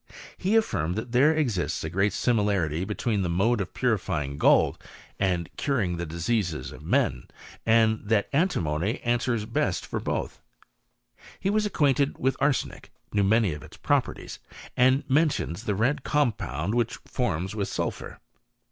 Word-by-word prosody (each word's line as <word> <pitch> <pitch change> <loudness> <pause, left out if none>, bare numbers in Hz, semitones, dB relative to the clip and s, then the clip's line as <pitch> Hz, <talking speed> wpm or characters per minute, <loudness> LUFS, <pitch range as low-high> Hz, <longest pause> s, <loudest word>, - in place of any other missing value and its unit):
He 190 +3 -1
affirmed^ 90 - +1
that 110 +2 -4
thete 145 +6 +4
exiittf 120 - -1
a 80 - -3
great 95 +4 +2
similarity 100 -8 +1
between 105 0 -1
the 90 - -1
mode 100 +6 +2
of 95 - -4
putifjrin^ 75 - -1
gold - - +4 0.4
and 90 -4 0
curing 100 -12 0
the 85 0 -4
diseases 85 - -2
df - - -11
men, 60 -1 0 0.4
and 110 -1 +4
that 105 -1 +2
antimony 100 - 0
answers 120 -2 0
best 115 - -1
for - - -3
both. - - -3 1.0
He 195 - 0
was 215 0 +2
acquainted 145 -6 +1
with 130 +1 +1
arsenic, 140 -1 -1 0.2
knew, 100 - +2
many 105 -3 +3
of 75 - -8
its - - -13
properties, - - -1 0.4
and 130 +3 +4
mentions 135 - +1
the 105 - 0
red 130 +7 +1
compound 105 - 0
Which 120 -1 0
it - - -16
forms 95 -6 -2
with 100 -2 -1
sulphur. - - -4
110 Hz, 150 wpm, -26 LUFS, 90-130 Hz, 1.0 s, thete